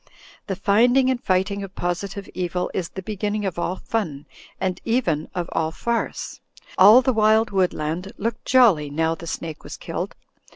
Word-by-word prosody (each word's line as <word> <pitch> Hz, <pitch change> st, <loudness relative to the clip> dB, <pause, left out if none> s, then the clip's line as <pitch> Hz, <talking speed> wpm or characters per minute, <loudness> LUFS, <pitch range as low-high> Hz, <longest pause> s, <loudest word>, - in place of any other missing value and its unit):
The 195 Hz, -, -2 dB
finding 245 Hz, +7 st, +3 dB
and 255 Hz, 0 st, -3 dB
fighting 190 Hz, +2 st, +1 dB
of 195 Hz, -1 st, -8 dB
positive 195 Hz, +3 st, -3 dB
evil 180 Hz, 0 st, -2 dB
is 175 Hz, -3 st, -2 dB
the 190 Hz, -, -8 dB
be 215 Hz, +3 st, -5 dB
ginning 210 Hz, +1 st, -2 dB
of 180 Hz, -3 st, -3 dB
all 175 Hz, +1 st, -1 dB
fun 165 Hz, -11 st, -3 dB, 0.2 s
— -, -, -24 dB
and 185 Hz, -1 st, -2 dB
even 205 Hz, -, 0 dB
of 175 Hz, -2 st, -2 dB
all 160 Hz, -1 st, 0 dB
farce. 235 Hz, +8 st, -3 dB, 0.3 s
All 215 Hz, +7 st, +8 dB
the 260 Hz, -, +2 dB
wild 220 Hz, +1 st, +3 dB
woodland 180 Hz, -1 st, -1 dB
looked 230 Hz, +2 st, -3 dB
jolly 215 Hz, -, +4 dB
now 160 Hz, +3 st, 0 dB
the 165 Hz, +1 st, -9 dB
snake 160 Hz, -1 st, -5 dB
was -, -, -8 dB
killed. -, -, -5 dB
195 Hz, 175 wpm, -23 LUFS, 170-220 Hz, 0.3 s, All